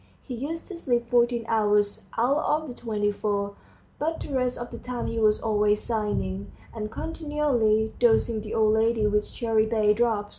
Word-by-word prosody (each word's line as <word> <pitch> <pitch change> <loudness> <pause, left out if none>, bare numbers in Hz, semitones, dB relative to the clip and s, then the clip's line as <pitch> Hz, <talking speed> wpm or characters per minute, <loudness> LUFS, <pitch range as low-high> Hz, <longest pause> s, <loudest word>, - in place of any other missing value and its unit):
He 260 - -7
used 295 +7 -4
to 370 - -6
sleep 240 -5 0
fourteen 240 -1 +2
hours 210 -2 +1
out 250 +5 +3
of 305 +1 0
the 250 - -6
twenty 215 -4 -1
four, 200 -1 -2 0.5
but 320 +2 -1
the 285 - -6
rest 255 -1 0
of 240 0 -6
the - - -7
time 250 -1 -4
he 230 - -2
was 215 -1 +3
always 210 -1 +2
sighing, 100 - -2 0.2
and 215 -2 -4
continually 260 -7 0
dosing 230 -1 +3
the 210 - -5
old 215 -1 +4
lady 220 0 +2
with 210 0 +2
cherrybay 220 -2 +2
drops. 220 -3 +1
225 Hz, 175 wpm, -26 LUFS, 210-245 Hz, 0.5 s, old